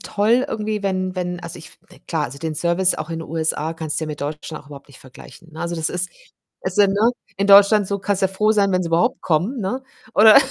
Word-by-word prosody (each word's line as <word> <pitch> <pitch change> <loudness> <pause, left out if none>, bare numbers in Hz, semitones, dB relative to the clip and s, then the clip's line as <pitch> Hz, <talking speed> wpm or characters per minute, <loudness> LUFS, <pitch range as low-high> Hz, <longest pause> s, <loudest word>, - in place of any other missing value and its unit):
toll 225 +5 +1
irgendwie, 215 -1 -3
wenn 185 -1 -1
wenn 180 -1 -3
also 170 -1 -8
ich - - -11
f - - -20
ne, - - -17
klar, - - -1
also 135 +3 -7
den 160 +1 -4
Service 175 +4 +1
auch 155 +1 -6
in 165 - -3
den 165 - -9
USA 160 0 -1
kannst 160 -2 -3
du 160 - -2
ja - - -7
mit 150 -1 -6
Deutschland 150 +2 -5
auch - - -23
überhaupt 140 -1 -12
nicht 140 - -15
vergleichen, 130 +5 -15
ne? 155 - -9
Also, 170 0 -3
das 160 -2 -1
ist 180 0 -2 0.5
es - - -4
sind, 200 -2 +4
ne, 215 +4 +3 0.3
in 200 0 0
Deutschland 200 +1 +7
so, 200 - -1
kannst 200 0 -2
ja 190 - +4
froh 210 +3 +1
sein, 200 -2 +2
wenn 185 0 +1
sie - - -4
überhaupt 175 +10 +1
kommen, 180 - 0
ne? 240 +8 -3 0.3
Oder 220 +2 +8
185 Hz, 255 wpm, -21 LUFS, 160-205 Hz, 0.5 s, Oder